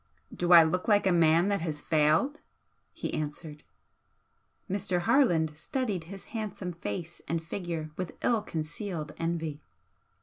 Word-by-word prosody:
"Do 175 Hz, 0 st, -1 dB
I 170 Hz, -1 st, +10 dB
look 180 Hz, +3 st, -1 dB
like 205 Hz, -2 st, +4 dB
a 190 Hz, -, +4 dB
man 170 Hz, +2 st, +4 dB
that 200 Hz, -3 st, 0 dB
has 155 Hz, -3 st, -3 dB
failed?" 160 Hz, -, +2 dB, 0.5 s
he -, -, -5 dB
answered. 150 Hz, 0 st, -5 dB, 1.0 s
Mr. 185 Hz, -2 st, 0 dB
Harland 170 Hz, -, +3 dB
studied 200 Hz, -, -2 dB
his 195 Hz, +3 st, -10 dB
handsome 205 Hz, -5 st, -4 dB
face 165 Hz, +3 st, -6 dB
and 165 Hz, -, 0 dB
figure 165 Hz, -2 st, -5 dB
with 180 Hz, -3 st, -5 dB
ill 230 Hz, -3 st, +3 dB
concealed 165 Hz, -2 st, -5 dB
envy. 165 Hz, -3 st, -2 dB
170 Hz, 135 wpm, -29 LUFS, 160-195 Hz, 1.0 s, I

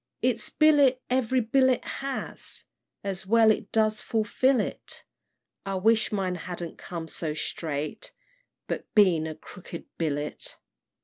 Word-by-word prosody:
"Its -, -, +3 dB
billet 290 Hz, -4 st, +5 dB
every 255 Hz, 0 st, +2 dB
bullet 260 Hz, +2 st, +3 dB
has, 275 Hz, -1 st, -5 dB, 0.4 s
And 195 Hz, -2 st, -3 dB
well 225 Hz, +1 st, +6 dB
it 210 Hz, -1 st, -2 dB
does 215 Hz, -1 st, +2 dB
fulfil 235 Hz, +4 st, +2 dB
it; -, -, -4 dB, 0.6 s
I 195 Hz, 0 st, -3 dB
wish 220 Hz, +3 st, +3 dB
mine 190 Hz, -3 st, 0 dB
hadn't 175 Hz, -1 st, -6 dB
come 170 Hz, -2 st, -6 dB
so 155 Hz, -2 st, -3 dB
straight. 155 Hz, -, -3 dB, 0.5 s
But -, -, -5 dB
been 180 Hz, -7 st, +5 dB
a 155 Hz, -, -5 dB
'crooked 175 Hz, 0 st, -10 dB
billet.' 150 Hz, -2 st, -3 dB
210 Hz, 125 wpm, -27 LUFS, 170-250 Hz, 0.6 s, well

